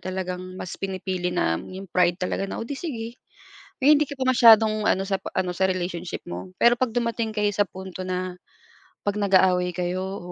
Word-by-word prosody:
talagang 185 0 -5
mas 180 - -6
pinipili 185 -2 -2
na 80 - +1
'yung 190 +1 -9
pride 175 -1 +3
talaga 190 +2 -1
na, - - -5
"O, - - -3
'di 285 - -5
sige" 240 -10 -4 0.8
na 280 +3 +6
hindi 300 0 +5
ka 285 - -7
pa 260 - +1
masyadong 220 -4 +6
ano, 190 - +2
sa 195 - 0
p - - -9
ano 180 -1 0
sa 190 +1 +2
relationship 180 -1 -3
mo. 180 +1 -7
Pero, 240 0 +6
'pag 255 -3 +1
dumating 230 -2 -1
kayo 210 0 +2
sa 205 - +3
punto 190 0 -8
na 185 0 -3 0.7
'pag 205 0 -1
nag-aaway 185 -2 +3
kayo 180 +1 -2
o 190 -2 -6
190 Hz, 200 wpm, -24 LUFS, 180-220 Hz, 0.8 s, na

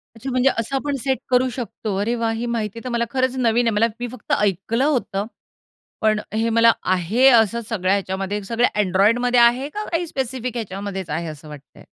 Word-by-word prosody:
अच्छा 245 +4 -6
म्हणजे 255 +2 +3
असं 230 +4 -3
आपण 285 +1 -1
सेट 265 -1 +1
करू 255 0 +3
शकतो. 225 -4 -5
अरे 230 +4 0
वाह! 230 -1 -1
ही 225 +2 -3
माहिती 230 -2 -3
तर 255 - -4
मला 235 -1 0
खरंच 260 0 0
नवीन 240 -1 +2
आहे. 225 - +1
मला 225 +2 +4
मी 245 - -3
फक्त 250 -4 -10
ऐकलं 210 - 0
होतं 220 -9 0 0.8
पण 215 -1 +2
हे 225 +1 +1
मला 230 0 +5
आहे 185 +8 +2
असं 235 -1 +4
सगळ्या 190 -4 +1
ह्याच्यामध्ये 195 +1 -2
सगळ्या 235 +4 +1
Androidमध्ये 230 +7 +3
आहे 240 +4 +4
का 420 +7 -5
काही 340 +1 -1
स्पेसिफिक 255 -4 -4
ह्याच्यामध्येच 195 -4 -5
आहे 165 +3 -3
असं 155 -1 -9
वाटतंय? 145 -2 -13
230 Hz, 190 wpm, -21 LUFS, 200-250 Hz, 0.8 s, मला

